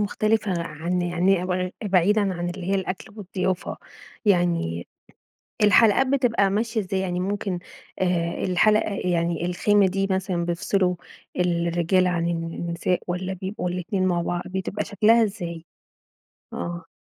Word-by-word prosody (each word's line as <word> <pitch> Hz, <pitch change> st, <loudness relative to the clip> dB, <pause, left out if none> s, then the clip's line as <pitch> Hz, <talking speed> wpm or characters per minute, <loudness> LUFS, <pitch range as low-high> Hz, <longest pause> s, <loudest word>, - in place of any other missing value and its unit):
مختلفة 210 Hz, -3 st, 0 dB
عن 170 Hz, +3 st, -2 dB
يعني 175 Hz, +1 st, +2 dB
ب 180 Hz, 0 st, -1 dB
بعيدًا 200 Hz, +2 st, +3 dB
عن 175 Hz, 0 st, -3 dB
اللي 180 Hz, 0 st, -7 dB
هي 195 Hz, -, +1 dB
الأكل 190 Hz, 0 st, -3 dB
والضيافة. 185 Hz, -2 st, -2 dB, 0.5 s
يعني 170 Hz, -, +1 dB, 0.8 s
الحلقات 220 Hz, +4 st, +5 dB
بتبقى 245 Hz, -7 st, +2 dB
ماشية 220 Hz, +3 st, 0 dB
إزاي؟ 190 Hz, 0 st, -2 dB
يعني 180 Hz, -1 st, -2 dB
ممكن، 195 Hz, -1 st, -2 dB, 0.4 s
آآ، 175 Hz, -2 st, 0 dB
الحلقة 210 Hz, +3 st, +3 dB
يعني 170 Hz, -3 st, 0 dB
الخيمة 200 Hz, +3 st, +3 dB
دي 195 Hz, +1 st, 0 dB
مثلًا 190 Hz, -2 st, -1 dB
بيفصلوا 180 Hz, +2 st, +1 dB, 0.4 s
الرجالة 175 Hz, +1 st, +2 dB
عن 170 Hz, -1 st, 0 dB
الن 170 Hz, 0 st, -3 dB
نساء 175 Hz, +2 st, 0 dB
والّا 185 Hz, +1 st, -2 dB
بيبقوا 185 Hz, -1 st, -4 dB
الاتنين 185 Hz, +2 st, -1 dB
مع 175 Hz, -1 st, +1 dB
بعض؟ 175 Hz, +1 st, -2 dB
بتبقى 190 Hz, +2 st, -3 dB
شكلها 225 Hz, +2 st, +4 dB
إزاي؟ 170 Hz, -6 st, -4 dB, 0.9 s
آه. 170 Hz, +1 st, -5 dB
185 Hz, 130 wpm, -24 LUFS, 175-200 Hz, 0.9 s, الحلقات